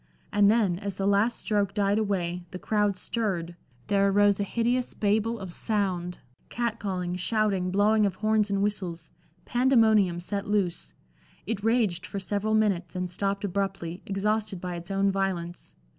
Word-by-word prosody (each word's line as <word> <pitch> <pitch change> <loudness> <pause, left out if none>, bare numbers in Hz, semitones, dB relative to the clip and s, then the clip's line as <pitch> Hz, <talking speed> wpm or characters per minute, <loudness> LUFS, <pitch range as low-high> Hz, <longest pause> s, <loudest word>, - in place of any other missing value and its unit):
And 205 -1 +5
then, 205 -6 +2
as 200 -2 -4
the 195 - -2
last 200 +4 +2
stroke 205 -3 0
died 205 0 +2
away, 180 -4 -1
the 185 - -7
crowd 205 0 0
stirred, 185 -7 -2 0.3
there 200 +3 +2
arose 205 0 +4
a - - +1
hideous 240 +4 -1
Babel 220 +2 +1
of 190 -4 -7
sound 185 -5 -1 0.3
cat 235 -1 -2
calling, 180 -3 -3
shouting, 195 -1 0
blowing 205 +2 +3
of 195 - -4
horns 215 -1 +1
and 200 0 +1
whistles; 180 -5 -3 0.3
pandemonium 220 -8 +3
set 200 +4 -4
loose. 195 -5 -1 0.5
It 205 -1 -3
raged 220 -6 +1
for 200 - -4
several 205 +3 -1
minutes, 195 -6 +1
and 180 -1 -3
stopped 200 +2 -2
abruptly, 195 -3 -3
exhausted 210 0 -1
by 180 0 -4
its 170 +1 -7
own 195 0 +2
violence. 185 -3 -3
200 Hz, 160 wpm, -27 LUFS, 185-215 Hz, 0.5 s, And